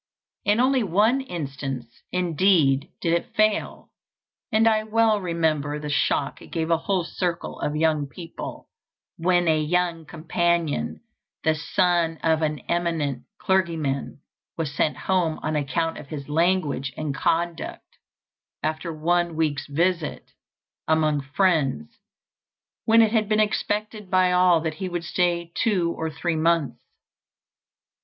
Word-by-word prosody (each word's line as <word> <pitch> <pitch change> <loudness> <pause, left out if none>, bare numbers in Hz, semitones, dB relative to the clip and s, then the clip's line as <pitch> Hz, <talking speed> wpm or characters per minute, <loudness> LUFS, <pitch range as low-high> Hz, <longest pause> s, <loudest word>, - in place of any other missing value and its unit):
In 205 +3 +3
only 260 +1 +3
one 215 +7 +2
instance, 135 - -6
indeed, 170 -5 +2
did 165 - +1
it 170 +7 -2
fail; 215 -1 0 0.6
and 220 0 +4
I 215 -1 +4
well 220 -1 +2
remember 160 -4 0
the 150 0 -5
shock 145 -1 0
it - - -12
gave 165 0 -2
a 165 - +4
whole 185 +2 0
circle 175 0 -3
of 150 - -2
young 155 -2 +1
people, 170 +2 -8 0.5
when 175 0 +2
a 155 -1 +3
young 170 0 0
companion, 160 - -1 0.4
the 160 - +3
son 165 +1 +1
of 160 -1 +2
an 150 -3 -1
eminent 165 -7 -1
clergyman, 165 -10 -1 0.4
was 155 -4 -2
sent 150 - 0
home 175 -4 0
on 155 0 -1
account 150 +3 -1
of 145 - -11
his 145 -2 -7
language 155 -4 +1
and 155 -2 -2
conduct 165 +3 -2 0.6
after 155 +2 -2
one 170 +2 0
week's 150 -3 -1
visit 170 +2 -1 0.6
among 155 -2 +2
friends, 140 - 0 0.9
when 225 0 +6
it 220 - +2
had 220 -2 +1
been 215 0 +2
expected 210 -1 -1
by 185 -1 +3
all 180 -2 +4
that 160 -1 -2
he 185 +4 -5
would 175 -1 -3
stay 170 0 0
two 180 -6 +1
or 160 0 -3
three 165 +2 -2
months. 165 -2 +1
165 Hz, 135 wpm, -24 LUFS, 150-185 Hz, 0.9 s, when